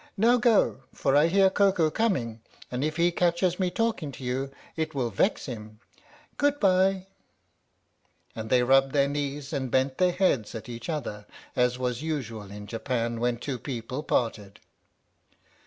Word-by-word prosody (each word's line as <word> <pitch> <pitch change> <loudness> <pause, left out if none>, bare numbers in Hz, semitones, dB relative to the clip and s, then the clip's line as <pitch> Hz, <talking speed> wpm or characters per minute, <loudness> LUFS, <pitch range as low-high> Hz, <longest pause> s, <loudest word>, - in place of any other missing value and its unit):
Now 235 +5 +5
go, 230 - +3
for 135 - 0
I 150 +3 +6
hear 190 +2 +4
Koko 190 -6 +3
coming, 130 - -1 0.3
and 125 +2 -2
if 155 +1 -1
he 170 +1 +3
catches 175 +1 +1
me 185 -1 +1
talking 215 -8 -1
to 130 - -10
you 130 +2 -2 0.3
it 160 -1 -3
will 125 -4 -1
vex 190 - +1
him. 110 -4 -8 0.6
Good 290 0 +2
bye! 190 -1 +3 0.7
" - - -42
And 110 0 -5
they 125 0 +4
rubbed 135 +1 +4
their 140 -1 +3
knees 145 0 -3
and 135 -3 -2
bent 130 +2 +1
their 180 -1 +4
heads 175 - +1
at 110 - -7
each 120 +2 -7
other, 110 -10 -4 0.3
as 125 0 +2
was 125 -1 -2
usual 120 -10 -4
in 105 +1 -8
Japan 115 +1 -2
when 120 0 0
two 125 +1 -4
people 125 +1 -5
parted. 110 -8 -2
135 Hz, 165 wpm, -27 LUFS, 120-175 Hz, 0.7 s, I